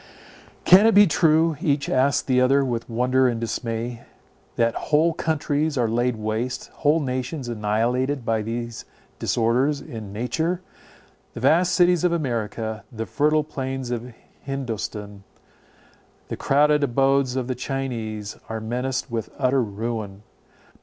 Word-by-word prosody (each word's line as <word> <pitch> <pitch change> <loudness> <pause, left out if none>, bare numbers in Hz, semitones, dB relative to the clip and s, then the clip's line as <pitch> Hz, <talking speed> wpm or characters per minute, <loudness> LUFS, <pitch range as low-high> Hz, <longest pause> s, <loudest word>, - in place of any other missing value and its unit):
Can 190 +5 +8
it 225 - +4
be 205 0 +9
true, 160 -2 +3
each 145 -5 +1
asked 135 +2 +2
the 125 -1 +3
other 135 +2 +4
with 120 -2 -3
wonder 130 +3 +2
and 120 -2 -1
dismay, 115 0 -3 0.5
that 115 -1 +2 0.2
whole 160 +2 +4
countries 155 -2 -1
are 120 -2 +2
laid 120 +2 0
waste, 110 +3 -3
whole 155 +2 +3
nations 130 0 -3
annihilated, 120 +4 0
by 110 -1 +1
these 115 +1 -5 0.4
disorders 125 +5 +1
in 110 -7 -8
nature? 160 - -2 0.7
The 115 - -6
vast 170 +7 +3
cities 180 -2 +4
of 180 - +3
America, 110 -7 -2
the 115 -2 -4
fertile 150 +3 +2
plains 130 -3 -4
of 120 +1 -4 0.3
Hindostan, 110 -6 -5 1.1
the - - -3
crowded 150 +1 +3
abodes 135 0 +2
of 130 -2 -2
the 130 - -1
Chinese, 120 -5 -4
are 110 0 -3
menaced 125 +3 -3
with 115 -5 -3
utter 130 -1 +2
ruin. 105 -2 -4
125 Hz, 135 wpm, -23 LUFS, 115-145 Hz, 1.1 s, be